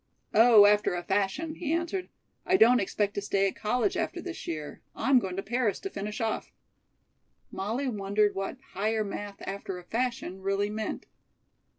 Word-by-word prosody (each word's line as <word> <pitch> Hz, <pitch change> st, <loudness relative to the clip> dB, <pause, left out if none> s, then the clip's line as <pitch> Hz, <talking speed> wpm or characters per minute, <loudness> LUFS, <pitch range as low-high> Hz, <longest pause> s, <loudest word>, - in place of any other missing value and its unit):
"Oh, 225 Hz, -2 st, +8 dB
after 205 Hz, -3 st, +4 dB
a 175 Hz, -, -3 dB
fashion," 205 Hz, -, -1 dB
he 320 Hz, -2 st, -4 dB
answered. 340 Hz, +3 st, -1 dB, 0.3 s
"I 370 Hz, +1 st, +3 dB
don't 245 Hz, -2 st, +6 dB
expect 205 Hz, 0 st, -1 dB
to 205 Hz, -, -2 dB
stay 195 Hz, -1 st, +1 dB
at 190 Hz, -, -3 dB
college 245 Hz, -, 0 dB
after -, -, -2 dB
this 350 Hz, -2 st, -7 dB
year. 155 Hz, -3 st, -5 dB
I'm 270 Hz, -1 st, +4 dB
going 190 Hz, -5 st, -4 dB
to 195 Hz, -, -3 dB
Paris 235 Hz, -1 st, 0 dB
to 390 Hz, -, -5 dB
finish 210 Hz, +2 st, -5 dB
off." 225 Hz, -1 st, -2 dB, 1.0 s
Molly 225 Hz, +8 st, -2 dB
wondered 205 Hz, -2 st, +1 dB
what 195 Hz, +5 st, -4 dB, 0.2 s
"Higher 215 Hz, +3 st, 0 dB
Math. 205 Hz, 0 st, -6 dB
after 195 Hz, -1 st, -5 dB
a 180 Hz, -, -10 dB
fashion" 230 Hz, -3 st, -3 dB
really 195 Hz, +1 st, 0 dB
meant. 215 Hz, 0 st, -4 dB
210 Hz, 170 wpm, -28 LUFS, 195-245 Hz, 1.0 s, Oh